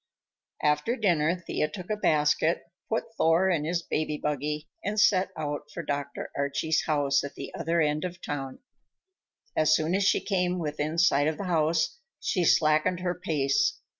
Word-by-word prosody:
After 150 +10 +2
dinner 175 -7 +2
Thea 170 -3 -2
took 185 +3 -7
a - - +2
basket, 155 -3 +2 0.3
put 225 +1 -2
Thor 170 +4 +3
in 155 -4 0
his 170 +1 -1
baby 155 -2 -2
buggy, 150 +1 -2 0.2
and 210 +2 -1
set 190 -2 +4
out 150 -1 -4
for - - -6
Dr. 145 -1 -4
Archie's 140 +3 0
house 145 -3 +2
at 140 - -7
the - - -7
other 170 +1 -1
end 150 0 +1
of 180 0 -5
town. 135 -5 -5 1.0
As 155 0 +4
soon 160 +2 0
as 195 +1 +2
she 200 - +3
came 180 -2 0
within 155 -1 -3
sight 145 -4 +4
of 155 - -1
the - - -4
house, 165 - +1 0.2
she 180 - 0
slackened 155 +4 +3
her 180 -1 0
pace. 150 -7 0
155 Hz, 165 wpm, -27 LUFS, 150-180 Hz, 1.0 s, set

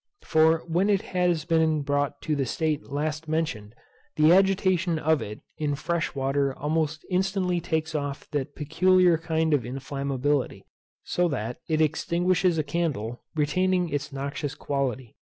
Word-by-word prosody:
For 160 +1 +3
when 175 +5 +1
it 200 -2 +2
has 175 -4 +1
been 160 -3 +2
brought 145 0 -1
to 155 - 0
the 135 -3 -1
state 155 +2 -1
last 155 +3 -3
mentioned, 125 -10 -2 0.4
the 155 +2 +6
agitation 185 -3 +3
of 155 -2 +2
it 105 -1 -7 0.2
in 150 -2 0
fresh 165 +2 -2
water 135 0 0
almost 155 +1 -1
instantly 185 -1 0
takes 160 -2 -2
off 145 -2 -3
that 145 0 -3
peculiar 180 +3 +3
kind 160 -1 0
of 145 - +3
inflammability, 135 +2 -2 0.4
so 175 0 +1
that 125 -6 -3
it 155 0 +2
extinguishes 175 +3 +1
a 155 - +1
candle, 140 -7 -2
retaining 180 +4 +1
its 145 0 -3
noxious 140 +1 -4
quality. 130 -5 -3
155 Hz, 145 wpm, -26 LUFS, 140-170 Hz, 0.4 s, the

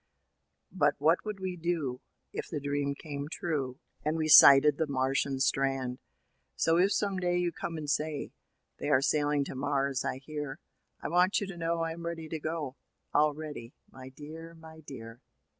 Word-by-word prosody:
But 150 -5 +2
what 155 +4 +3
would 210 -2 -4
we 185 -1 -3
do 160 -7 -2 0.3
if - - -5
the 155 - -3
dream 140 0 -1
came 145 -1 -6
true, 140 -7 -3 0.2
And 155 +2 0
we 155 -1 0
sighted 140 0 +9
the 160 - +1
Martian 135 0 0
strand? 135 -2 0 0.6
So, 165 0 +2
if 195 +3 +4
some 200 -2 0
day 175 -1 +1
you 175 -1 +1
come 165 0 -5
and 150 -1 -5
say, 150 0 -1 0.5
They - - -2
are 130 - +4
sailing 145 -1 +2
to - - -6
Mars, 140 -1 0
I - - -2
hear. 145 0 -6 0.5
I - - -1
want 180 +4 +3
you 200 - -3
to 195 -2 -7
know 165 0 -1
I 165 - -2
am 170 +1 -6
ready 165 -1 -5
to 160 - -3
go,— 155 -3 -4 0.4
All 150 -1 +3
ready, 145 -6 -8 0.2
my 130 0 -10
dear, 160 +4 -10
my 160 -1 -13
dear. 120 -5 -10
150 Hz, 180 wpm, -30 LUFS, 135-165 Hz, 0.6 s, sighted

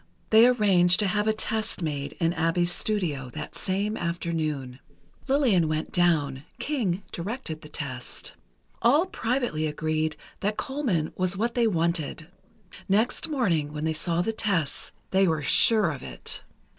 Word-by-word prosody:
They 225 +2 +8
arranged 195 -7 +4
to 205 - +2
have 210 +2 0
a - - +5
test 215 -3 -2
made 145 -2 -3
in 165 -1 0
Abbe's 170 +1 +1
studio, 170 -12 -2
that 150 -1 -6
same 200 +3 -1
afternoon. 155 - -2 0.5
Lillian 250 - +3
went 155 0 -2
down; 150 -7 +2 0.2
King 205 - -1
directed 175 -4 -5
the 150 - -11
test. 130 -5 -5 0.5
All 290 +9 +5
privately 240 - -1
agreed 155 0 -1 0.2
that 210 +1 -1
Colman 245 - -1
was 185 +1 0
what 235 +3 0
they 235 -2 +3
wanted; 170 -4 -1 0.6
next 225 +10 +2
morning, 170 - 0
when 150 0 -4
they 160 0 +1
saw 170 +2 0
the 225 - 0
tests, 195 -10 -1 0.2
they 190 0 +4
were 160 -3 0
sure 215 +4 +4
of 140 -3 -7
it. - - -5
175 Hz, 145 wpm, -26 LUFS, 155-215 Hz, 0.6 s, They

